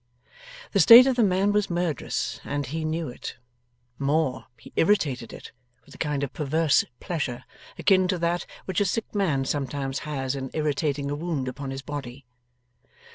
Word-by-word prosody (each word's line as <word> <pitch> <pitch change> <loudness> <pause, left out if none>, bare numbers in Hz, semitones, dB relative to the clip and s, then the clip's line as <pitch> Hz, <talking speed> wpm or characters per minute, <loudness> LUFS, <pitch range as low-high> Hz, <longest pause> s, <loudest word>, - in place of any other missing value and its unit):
The 200 - +2
state 235 +8 +10
of 265 -1 +2
the 240 - +3
man 195 +1 +2
was 210 -1 +1
murderous, 175 -4 -2
and 145 0 -3
he 155 +5 -4
knew 160 +1 -2
it. 120 - -8 0.6
More; 140 -1 0
he - - -15
irritated 140 - +1
it, - - -10 0.3
with - - -16
a - - -15
kind 150 -3 -1
of 140 - -4
perverse 155 +1 +2 0.2
pleasure 130 -8 -3 0.3
akin 185 -2 +4
to 185 0 0
that 170 +1 -1 0.2
which 190 0 -1
a - - +3
sick 220 +4 -2
man 160 -10 +1
sometimes 135 -1 -2
has 135 -4 -3
in 135 -1 -4
irritating 145 -2 -1
a - - -1
wound 150 -4 -3
upon 135 +2 -5
his 135 0 -6
body. 140 -2 -7
150 Hz, 170 wpm, -25 LUFS, 135-175 Hz, 0.6 s, state